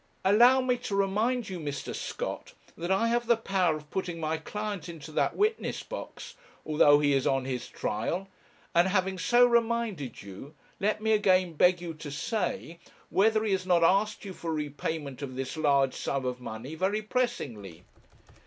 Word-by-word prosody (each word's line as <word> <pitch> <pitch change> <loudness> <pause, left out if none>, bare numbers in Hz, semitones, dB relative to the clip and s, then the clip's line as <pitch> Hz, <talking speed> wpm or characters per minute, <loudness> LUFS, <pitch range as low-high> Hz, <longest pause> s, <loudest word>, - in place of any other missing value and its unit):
'Allow 240 +7 +6
me 250 -1 +1
to 240 -5 -4
remind 215 +5 +1
you, 185 -2 -5
Mr. 145 -3 -5
Scott, - - -5 0.2
that 175 +1 -5
I 195 +4 +2
have 240 0 0
the 235 -1 +4
power 190 -7 +1
of 150 -1 -11
putting 175 -3 -3
my 160 0 -1
client 205 0 -5
into 155 -3 -9
that - - 0
witness 430 +2 0
box, - - -8 0.3
although 150 -1 +5
he 145 -1 +2
is 135 -1 +1
on 135 -1 +1
his 125 -2 -4
trial; 165 - -3 0.5
and, 170 +2 +4
having 190 -1 0
so 245 +4 +5
reminded 230 - 0
you, 100 +10 -10 0.2
let 210 +2 0
me 220 - +2
again 185 -4 +3
beg 180 +3 +4
you 170 -2 -5
to 155 -1 -8
say 170 +2 -3 0.3
whether 215 +2 +3
he 215 - 0
has 185 -1 -1
not 175 -2 +4
asked 205 +5 +2
you 195 - -6
for 170 -2 -5
repayment 150 -2 -4
of 130 -2 -6
this 135 +2 -4
large 140 -4 +2
sum 135 -2 -2
of 125 0 -3
money 120 +5 -7
very 195 +6 -1
pressingly.' 120 - -3
180 Hz, 175 wpm, -28 LUFS, 145-215 Hz, 0.5 s, Allow